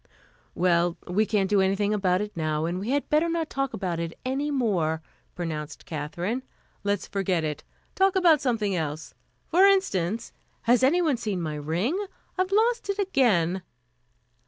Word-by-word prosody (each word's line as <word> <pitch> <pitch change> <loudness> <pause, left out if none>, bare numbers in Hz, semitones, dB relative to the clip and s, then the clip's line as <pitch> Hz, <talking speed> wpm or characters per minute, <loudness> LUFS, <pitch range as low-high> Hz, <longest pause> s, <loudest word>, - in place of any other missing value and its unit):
"Well, 175 -1 +2
we 205 +4 +1
can't 205 -3 +1
do 200 0 +3
anything 195 +2 +1
about 190 -2 +1
it 210 0 -5
now, 155 -1 -1
and 175 +2 -2
we 205 +5 -4
had 285 +2 0
better 310 +3 +2
not 330 -1 -2
talk 275 -1 -1
about 180 -8 -3
it 165 0 -4
any 275 +3 -1
more," 180 - 0 0.3
pronounced 155 -4 -5
Katherine. 170 - -3 0.4
"Let's 200 -1 0
forget 185 -4 -1
it. 150 -1 -3 0.3
Talk 385 0 +3
about 340 -6 +5
something 220 -7 0
else. 155 -2 -4 0.3
For 360 +4 +4
instance 230 - +1 0.3
has 240 +1 +4
anyone 305 +1 +3
seen 210 -5 -2
my 160 -3 -3
ring? 175 - -1 0.3
I've 370 0 0
lost 460 +2 +2
it 400 - 0
again." 210 - +2
205 Hz, 160 wpm, -26 LUFS, 170-280 Hz, 0.4 s, about